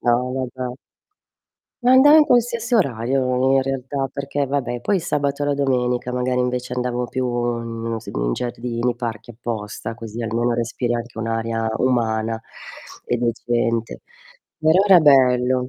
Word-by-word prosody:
Ah, 120 0 +3
vabbè. 125 0 -3 1.1
E 250 - +5
andavo 275 +4 +8
in 305 - +6
qualsiasi 235 -2 +2
orario, 130 - +1
in - - +4
realtà, 135 +1 -3
perché 140 0 -2
vabbè, 130 -3 -2
poi 205 - +1
il 180 - -2
sabato 145 -1 -1
e - - 0
la 145 - +1
domenica, 125 -3 0
magari, 125 0 0
invece 125 0 -2
andavo 125 0 -2
più 130 -1 -2 0.3
in 115 -1 -6
non 115 0 -2
s - - -15
in - - -2
giardini, 120 0 -2
parchi, 120 -1 -6
apposta, 110 -1 -5
così 115 0 -7
almeno 115 +2 0
respiri 120 +1 -2
anche 120 -1 -5
un'aria 115 0 -2
umana 115 -3 0 0.6
e 120 - 0
decente. 115 -1 -1 0.6
Però 160 +3 +4
era 195 -3 +7
bello. 130 -4 +4
125 Hz, 150 wpm, -21 LUFS, 115-135 Hz, 1.1 s, andavo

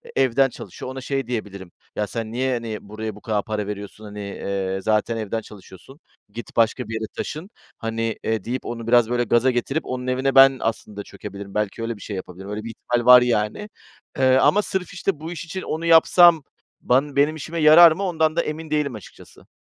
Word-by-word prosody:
evden 135 +1 +3
çalışıyor, 130 - -9
ona 130 0 -7
şey 135 -1 -3
diyebilirim, 100 -6 -6 0.2
"Ya, 105 -1 -1
sen 110 0 -5
niye, 130 +2 -1
hani, 115 -3 -4
buraya 110 +1 -7
bu 105 - -14
kadar 105 -3 -1
para 105 -2 -4
veriyorsun? 105 +1 -7
Hani, 105 0 -9
eee, 100 -1 -4
zaten 110 +2 0
evden 110 +1 -3
çalışıyorsun, 105 - -15 0.3
git 120 - -9
başka 115 +1 +1
bir 115 - -6
yere 110 0 -3
taşın, 160 +7 -6 0.3
hani, 115 0 -3
eee" 110 -4 -1
deyip 125 +2 -4
onu 115 -1 -6
biraz, 120 -1 +4
böyle, 120 0 +1
gaza 120 +3 +2
getirip 135 +5 -2
onun 130 0 -5
evine 130 +2 0
ben 135 0 +7
aslında 105 -2 -4
çökebilirim. 100 -1 -10
Belki 105 +1 -2
öyle 115 0 -3
bir - - -16
şey 105 - -6
yapabilirim. 95 +1 -8
Öyle 105 +1 -5
bir 115 - -6
ihtimal 120 +1 -2
var, 125 0 +9
yani, 120 - -1 0.5
eee, 130 -1 +4
ama 205 +9 +4
sırf, 190 -1 -4
işte, 185 -4 -2
bu 160 +2 -7
iş 170 -1 -6
için 185 +3 -6
onu 160 +2 -4
yapsam 165 -1 +6 0.4
ban 135 +3 +1
benim 145 +3 +2
işime 165 +2 -6
yarar 160 +2 +8
mı, 190 +5 -3
ondan 160 -4 0
da - - +2
emin 155 0 -6
değilim 145 -5 0
açıkçası. 105 - -14
120 Hz, 200 wpm, -22 LUFS, 105-140 Hz, 0.5 s, var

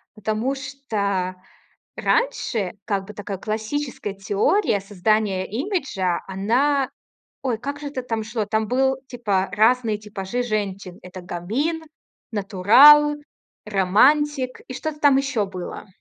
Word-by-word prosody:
Потому 220 +6 -1
что 210 -10 -2 0.6
раньше, 230 - 0
как 195 -2 -2
бы, 210 - -9
такая 205 -2 -6
классическая 220 +1 -3
теория 200 - +1
создания 200 0 0
имиджа, 240 - -2
она 255 +8 +1 0.5
ой, 250 -4 0
как 280 +4 -5
же 290 - -6
это 260 -3 -5
там 225 -3 -3
шло, 220 -2 -3
там 220 +1 0
был, 265 +1 +2
типа, 205 -6 -1
разные 220 +1 +3
типажи 210 +3 -4
женщин: 200 -5 -3
это 180 0 -9
гамин, 245 - -2 0.5
натурал, 225 +10 +6 0.5
романтик 255 +8 +2
и 255 - -6
что-то 305 +2 -4
там 285 -3 +5
ещё 270 -7 0
было. 185 +2 -7
220 Hz, 120 wpm, -22 LUFS, 195-270 Hz, 0.6 s, натурал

